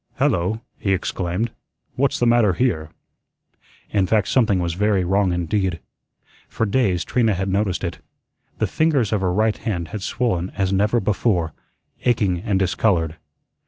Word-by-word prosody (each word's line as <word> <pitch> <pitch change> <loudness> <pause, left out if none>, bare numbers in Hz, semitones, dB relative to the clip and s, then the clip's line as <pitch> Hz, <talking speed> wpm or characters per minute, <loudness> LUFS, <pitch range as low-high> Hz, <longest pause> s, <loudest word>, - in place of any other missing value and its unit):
"Hello," 95 +6 +1 0.2
he 95 - +1
exclaimed, 95 +4 -2 0.4
"what's 140 +1 +1
the 120 - +1
matter 120 -5 +4
here?" 85 -7 0 1.0
In 100 -3 +2
fact 105 -1 +2
something 110 -7 +3
was 85 -2 -1
very 100 +1 +1
wrong 95 +1 +2
indeed. 90 +1 -1 0.7
For 115 - -1
days 100 -6 +1
Trina 115 -5 +2
had 95 +2 -2
noticed 95 -1 0
it. 85 -1 -4 0.6
The - - +1
fingers 145 -9 +1
of 105 - +1
her 90 -2 +1
right 110 +3 +1
hand 85 -7 -3
had 105 - -5
swollen 95 -5 -1
as 95 -1 +1
never 105 +5 +2
before, 95 -6 0 0.5
aching 105 -7 +2
and 100 -2 0
discolored. 90 -4 +1
100 Hz, 150 wpm, -22 LUFS, 90-110 Hz, 1.0 s, matter